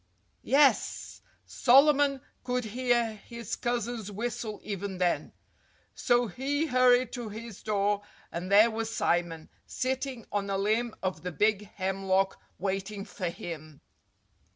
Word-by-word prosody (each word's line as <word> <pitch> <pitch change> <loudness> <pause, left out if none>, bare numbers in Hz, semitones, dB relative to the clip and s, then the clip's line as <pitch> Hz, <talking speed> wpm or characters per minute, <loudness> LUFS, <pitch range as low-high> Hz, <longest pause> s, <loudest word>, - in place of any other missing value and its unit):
Yes! 275 +2 +2 0.2
Solomon 275 +1 +4 0.2
could 250 -1 -1
hear 240 0 +1
his 235 -3 -5
cousin's 235 -3 -2
whistle 215 0 -4
even 200 -2 -4
then. 180 -1 0 0.6
So 240 -1 +2
he 275 - -1
hurried 255 -3 +4
to 240 -4 -5
his 220 -1 -8
door; 205 -1 +1 0.3
and 180 +3 -5
there 215 +3 +7
was 225 0 -3
Simon, 170 -6 0 0.2
sitting 260 -2 -3
on 200 -1 -1
a 195 - 0
limb 220 +4 0
of 185 -1 -2
the 180 - -4
big 210 +3 +1
hemlock 190 0 0 0.2
waiting 195 +1 -3
for 185 -4 -4
him! 155 -3 -8
215 Hz, 125 wpm, -29 LUFS, 195-245 Hz, 0.6 s, there